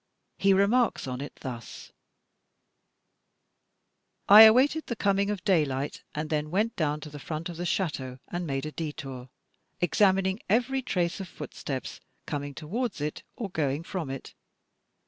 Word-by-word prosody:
He 195 - +4
remarks 200 +4 +3
on 130 0 -4
it 145 - -7
thus: 120 -3 -8 2.4
"I 210 +2 +11
awaited 265 +8 +4
the 235 - -2
coming 200 -1 +1
of 205 -4 -3
daylight 150 -8 +1
and 155 +1 -3
then 150 0 0
went 210 +7 0
down 150 -2 -1
to 150 - -8
the 145 - -8
front 155 +3 -5
of 170 - -7
the 175 +1 -2
chateau, 135 -10 -2
and 175 -1 -4
made 135 0 -2
a 155 - -4
detour, 140 -5 -6 0.5
examining 190 +2 +3
every 250 +5 +2
trace 175 -8 -1
of 190 - -5
footsteps 135 -5 -6 0.3
coming 145 -1 -4
towards 205 +7 -3
it 150 +1 -3
or 205 -5 -5
going 145 -1 -1
from 170 -4 -4
it. 135 -1 -7
165 Hz, 145 wpm, -28 LUFS, 145-200 Hz, 2.4 s, I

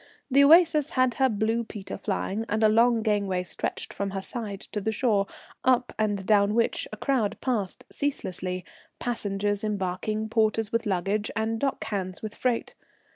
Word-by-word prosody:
The 280 +2 +6
Oasis 320 -1 +6
had 255 -2 +3
her 265 - +5
blue 220 +2 0
peter 210 -3 -7
flying, 200 +1 -2
and 215 +1 +1
a - - +7
long 230 +1 +4
gangway 200 -4 +1
stretched 165 -3 -4
from 200 0 -2
her - - -2
side 210 -5 -5
to 210 - -2
the 220 - 0
shore, 210 -4 +1 0.4
up 250 -1 +2
and 205 -3 0
down 205 0 +4
which 230 0 +1
a 215 - -6
crowd 240 -3 0
passed 215 -8 -2
ceaselessly, 185 -10 -2 0.3
passengers 205 -3 -1
embarking, 210 +1 -2
porters 220 -1 +1
with 230 -1 0
luggage, 200 +2 0
and 225 0 -1
dock 275 +1 -1
hands 190 -3 -4
with 215 -1 -4
freight. 245 0 -1
215 Hz, 165 wpm, -27 LUFS, 200-235 Hz, 0.4 s, a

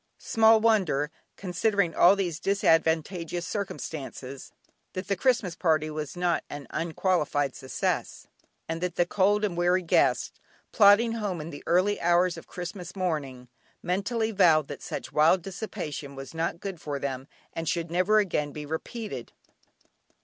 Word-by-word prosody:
Small 225 0 +4
wonder, 185 -10 +2 0.3
considering 190 -1 0
all 180 +5 +6
these 175 -5 -2
disadvantageous 165 -2 +1
circumstances, 140 -9 -6 0.4
that 185 0 -5
the 200 - +1
Christmas 230 -4 +1
party 155 -3 +1
was 150 +2 -5
not 175 -1 +1
an 145 -1 -7
unqualified 160 -5 0
success, 130 - -3 0.4
and 165 +1 -4
that 180 -1 -2
the 175 - +3
cold 205 +3 +2
and 190 -4 -3
weary 180 +1 +2
guests, 170 - +2 0.4
plodding 210 +2 +6
home 205 -6 -3
in 155 +2 -6
the 145 - -9
early 185 +4 +2
hours 175 +1 +3
of - - -11
Christmas 180 0 -7
morning, 145 -9 -3 0.4
mentally 220 +5 -1
vowed 165 -7 +4
that 145 - -7
such - - -6
wild 165 +4 +4
dissipation 175 -8 -6
was 135 +2 -8
not 165 +1 -2
good 190 -4 -6
for 145 -2 -3
them 135 -1 -4 0.3
and 165 -1 -3
should 170 -1 -2
never 185 +5 +3
again 165 -8 +1
be 150 +1 -7
repeated. 210 +9 -6
175 Hz, 145 wpm, -27 LUFS, 155-195 Hz, 0.4 s, all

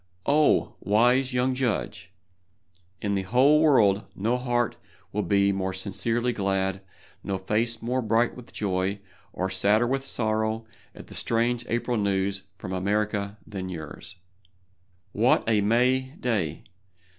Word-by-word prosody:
Oh, 150 +1 +3
wise 125 +6 +3
young 125 +1 +1
judge! 125 -4 -2 0.9
In 100 -1 0
the 100 - +1
whole 130 +10 +4
world 110 -10 +4
no 115 +5 0
heart 120 -1 0 0.4
will 105 - -1
be 100 +1 +2
more 95 -1 -2
sincerely 115 +5 -1
glad, 95 -2 -1 0.4
no 95 - -2
face 115 +5 -1
more 125 +2 0
bright 115 +1 +1
with 125 -2 -12
joy, 95 0 -1 0.3
or 95 - -2
sadder 100 +5 +2
with 135 +2 -2
sorrow, 110 -1 -1 0.3
at - - -10
the - - -13
strange 120 +1 0
April 120 +1 -1
news 100 -1 0 0.2
from 95 - -6
America 100 +2 -1
than 95 -2 -6
yours! 80 +2 -7 1.0
What - - +3
a 110 -2 +3
May 130 +5 +2
day! 95 - -1
110 Hz, 135 wpm, -26 LUFS, 100-120 Hz, 1.0 s, whole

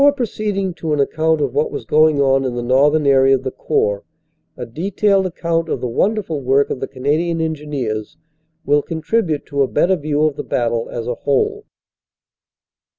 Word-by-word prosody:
Before 285 0 +6
proceeding 210 -7 -2
to 160 -2 -1
an 150 - 0
account 160 +2 +1
of 135 -4 -1
what 145 +2 +1
was - - -6
going 155 -1 +3
on 135 -1 +3
in 125 -2 -2
the 120 - -3
northern 145 +5 +3
area 135 -1 +5
of 130 - -4
the 130 - -3
Corps, 100 -4 -1 0.5
a - - -5
detailed 190 - 0
account 165 -1 -2
of - - -1
the 125 - -3
won 200 - +1
derful 165 -9 -4
work 135 +2 +2
of - - -3
the 135 - -3
Canadian 155 +6 -1
Engineers 145 -9 -3 0.5
will 145 +1 +3
contribute 160 0 -1
to 140 -2 -2
a 135 - +3
better 190 +7 +2
view 150 -2 -1
of 155 -2 +1
the - - -4
battle 115 -1 -1
as 115 -1 -5
a 125 - -1
whole. 425 - -1
150 Hz, 190 wpm, -18 LUFS, 135-165 Hz, 0.5 s, Before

